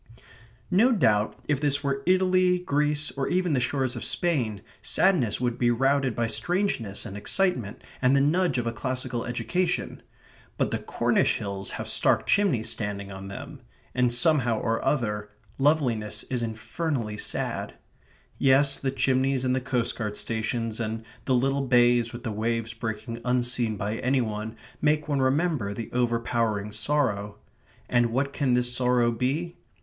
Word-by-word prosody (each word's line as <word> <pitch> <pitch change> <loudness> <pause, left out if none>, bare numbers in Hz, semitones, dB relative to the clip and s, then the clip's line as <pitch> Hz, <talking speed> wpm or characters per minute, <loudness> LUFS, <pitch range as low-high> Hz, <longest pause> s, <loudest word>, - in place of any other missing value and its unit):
No 220 +8 +5
doubt 110 - +2
if 145 -2 0
this 145 -1 +1
were 140 -1 -1
Italy, 185 -1 +4
Greece, 150 -3 0
or 135 -1 -2
even 180 -2 +1
the 130 - +2
shores 130 0 -1
of 120 - -5
Spain, 125 - 0 0.2
sadness 165 - +2
would 120 -1 -1
be 120 - +3
routed 135 0 +2
by 120 - 0
strangeness 120 - -1
and 100 - -7
excitement 125 - -1 0.2
and 130 +1 +4
the - - +5
nudge 170 +4 +2
of 120 - -1
a 115 - 0
classical 125 +1 -2
education. 180 +9 -1 0.6
But - - 0
the - - -1
Cornish - - +1
hills 100 -1 -4
have - - -5
stark - - +2
chimneys 190 - +2
standing 100 -2 -3
on 95 0 -8
them; 100 - -8 0.3
and, 125 -1 +2
somehow 125 -4 +2
or 115 -1 -1
other, 105 -6 -1 0.3
loveliness 120 -8 +1
is 125 -2 -1
infernally 115 0 -3
sad. - - -3 0.6
Yes, 135 +1 +4
the 135 - -1
chimneys 130 0 +1
and 130 0 +2
the 130 - -1
coast 125 -2 -1
guard 105 -2 -3
stations 115 0 -2
and 110 0 -3 0.2
the 130 - +2
little 135 +3 +1
bays 120 -1 +4
with 120 0 -8
the 115 - -3
waves 115 +2 -2
breaking 115 0 -5
unseen 125 -3 0
by 105 +3 -2
any 130 +3 +1
one 110 -1 -3 0.3
make 150 0 +2
one 140 -3 0
remember 130 - +1
the 115 0 -6
overpowering 115 -3 0
sorrow. 110 -3 -1 0.5
And 120 -1 +3
what 135 +4 -1
can 130 -4 +1
this 125 0 +2
sorrow 125 -1 +2
be? 145 +9 -2
125 Hz, 155 wpm, -26 LUFS, 115-140 Hz, 0.6 s, No